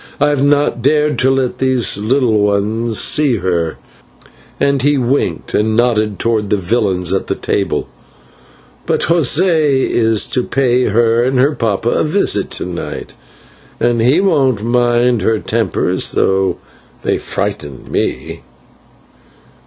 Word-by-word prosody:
I 145 +1 +3
have 145 -2 0
not 145 0 +1
dared 150 0 +1
to 130 - +3
let 135 -2 -1
these 130 -4 +1
little 115 0 +1
ones 105 +2 0
see 145 -5 +3
her," 85 -5 -2 0.8
and 140 -1 +1
he 145 +2 +2
winked 130 +2 -1
and 110 +1 +1
nodded 110 -4 +1
towards 110 -3 -1
the 105 - +1
villains 95 -2 -1
at - - -2
the - - -1
table, - - -2 1.0
"but - - 0
José 160 -3 +2
is 115 -2 +1
to 125 - -1
pay 125 -2 +1
her 115 +2 +2
and 130 +1 0
her 140 +4 +3
papa 115 -3 -1
a - - +1
visit 155 - 0
to - - -4
night, 90 -1 -6 0.7
and 120 -1 +1
he 130 +9 +3
won't 135 - +1
mind 120 0 +1
her 110 +3 +1
tempers, 105 -4 -1
though 95 0 +1 0.5
they - - 0
frighten 95 -9 -5
me. - - -3
120 Hz, 135 wpm, -15 LUFS, 105-135 Hz, 1.0 s, I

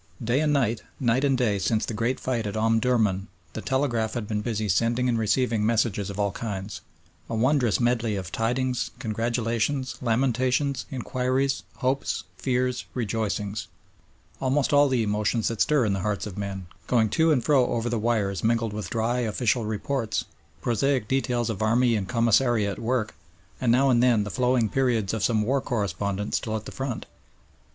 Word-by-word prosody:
Day 120 +4 +1
and 155 -1 +2
night, 120 -6 +1 0.2
night 130 +1 +2
and 135 -2 +3
day 110 -5 +1
since 110 +2 +1
the - - -4
great 115 +4 -1
fight 120 -4 -2
at 100 - -4
Omdurman 110 -3 +2 0.3
the 110 - -5
telegraph 120 -5 0
had 115 -4 -3
been 105 -1 -1
busy 110 -1 -2
sending 115 +6 +1
and 120 - +2
receiving 110 0 +1
messages 110 -3 +1
of 100 0 -6
all 100 -1 +1
kinds: 100 -1 -5 0.5
a 115 - -2
wondrous 125 -1 +2
medley 120 -3 +1
of 95 -2 -5
tidings, 125 +2 -1
congratulations, 115 +4 -1
lamentations, 125 +3 +1
inquiries, 130 +1 -1
hopes, 135 +2 -1
fears, 125 -1 -1
rejoicings; 105 -3 -2 0.7
almost 135 +2 +1
all 145 0 +6
the 125 -3 +1
emotions 105 +2 0
that 115 -3 -3
stir 145 -7 +3
the 100 -1 0
hearts 100 +1 -2
of 105 -4 -7
men, 100 -2 -5 0.2
going 115 -3 +3
to 160 +8 +3
and 130 -6 +2
fro 135 -5 +4
over 120 0 -1
the 120 -1 -1
wires 105 -4 0
mingled 115 -1 +1
with 105 -1 -5
dry, 115 +2 0
official 115 0 0
reports, 110 +2 -2 0.4
prosaic 125 0 +1
details 125 -2 0
of 110 -4 -3
army 120 +2 +3
and 95 -3 -3
commissariat 115 -3 +2
work, 115 -2 -1 0.5
and 120 -2 +3
now 135 +2 +4
and 120 -1 +4
then 120 -4 +4
the 105 - -5
flowing 125 0 +2
periods 115 -5 0
of 110 -3 -2
some 110 +1 +2
war 135 +5 +1
correspondent 100 - -2
still 110 -1 -1
at 110 0 -4
the - - -7
front. 130 -4 -4
115 Hz, 170 wpm, -26 LUFS, 105-125 Hz, 0.7 s, all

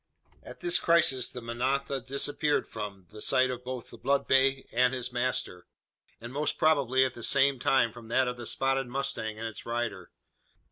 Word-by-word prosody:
At - - -12
this 350 -1 +3
crisis 145 -7 +3
the 125 - -8
manada 130 +3 -1
disappeared 140 +3 -1
from, 100 -4 -7
the 105 0 -11
sight 130 +1 +2
both 125 -1 -5
of - - -16
the - - -11
blood 140 +2 +1
bay 135 0 +3
and 125 +2 +3
his 125 0 -5
master; 120 -7 -2 0.5
and 120 +2 -9
most 150 +2 -1
probably 135 -4 +3
at 130 - -3
the 120 - -10
same 140 +2 +3
time 120 -3 +2
from 120 -2 -12
that 130 +3 +2
of 125 - -2
the 120 -2 -6
spotted 135 -1 0
mustang 115 -4 -2
and 115 +1 -4
its 110 - -8
rider. 115 -6 -3
130 Hz, 185 wpm, -29 LUFS, 120-135 Hz, 0.5 s, this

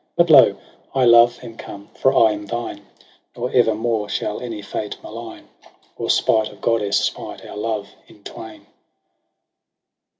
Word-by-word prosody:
But 170 -1 +3
lo! 130 -9 +7 0.4
I, 130 -2 +3
love, 120 0 +6
am 115 -2 -10
come, 100 0 -10
for 130 - +2
I 115 -5 +4
am 105 -1 -6
thine: 105 -2 -5 0.5
Nor 125 +1 -3
ever 115 -3 +3
more 110 -2 -2
shall 105 - -3
any 115 -4 -6
fate 105 +2 -5
malign. 115 0 -9 0.5
Or - - -5
spite 110 -1 +2
of 105 - -16
goddess 105 -3 +1
smite - - -4
our - - -10
love 105 -1 -3 0.2
in 105 - -20
twain. 105 -2 -10
110 Hz, 155 wpm, -20 LUFS, 105-120 Hz, 0.5 s, lo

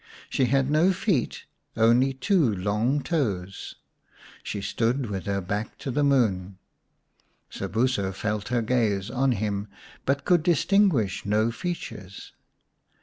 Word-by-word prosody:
She 130 - +2
had 135 +2 +1
no 165 +5 +4
feet, 185 - -1 0.3
only 120 +4 +4
two 135 - +2
long 105 +9 0
toes. 100 - -2 0.7
She 105 - -4
stood 115 +4 -1
with 95 -2 -4
her 100 -1 0
back 105 +4 -4
to 135 - -5
the 145 +4 +1
moon; 100 -9 +1 0.9
Sobuso 110 -4 -1
felt 105 +2 -3
her 120 -1 0
gaze 110 -4 0
on 130 +1 +2
him, 100 -1 -2 0.4
but 140 +1 0
could 175 -3 +4
distinguish 170 - +2
no 110 +3 +1
features. 115 - -6
115 Hz, 125 wpm, -26 LUFS, 100-140 Hz, 0.9 s, no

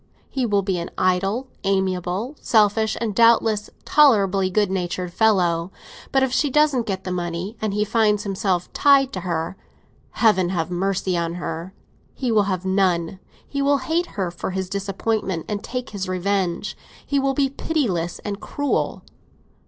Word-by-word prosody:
He 260 -3 0
will 200 -2 +2
be 185 -2 -1
an 170 - -5
idle, 195 +7 +1 0.2
amiable, 190 - -1
selfish, 220 0 +2
and 225 -3 -2
doubtless 225 -1 +4 0.2
tolerably 200 -10 +4
good 205 0 +1
natured 180 -1 -3
fellow. 180 -6 +2 0.4
But 270 0 +3
if 260 -1 0
she 290 - +2
doesn't 280 -4 +2
get 190 -2 -3
the 185 - -4
money 175 +3 -3
and 215 -2 0
he 210 +1 0
finds 210 -1 +2
himself 190 -3 -1
tied 275 -2 +4
to - - -3
her, 170 0 -3 0.6
Heaven 190 -6 +3
have 170 -2 -2
mercy 190 0 0
on 170 0 -1
her! 175 +2 -5 0.4
He 255 -3 -1
will 210 -2 +3
have 185 -1 -2
none. 185 -2 +1 0.3
He 280 - -3
will 280 0 +3
hate 330 +6 -1
her 185 -3 -1
for 175 - -5
his 190 0 -3
disappointment, 195 -2 -2
and 210 0 -3
take 250 0 -5
his 190 -3 -4
revenge; 185 -1 -1 0.3
he 280 - +1
will 270 0 0
be 275 -1 +1
pitiless 220 - -1
and 205 -1 -3
cruel. 285 -1 -2
195 Hz, 160 wpm, -22 LUFS, 185-230 Hz, 0.6 s, doubtless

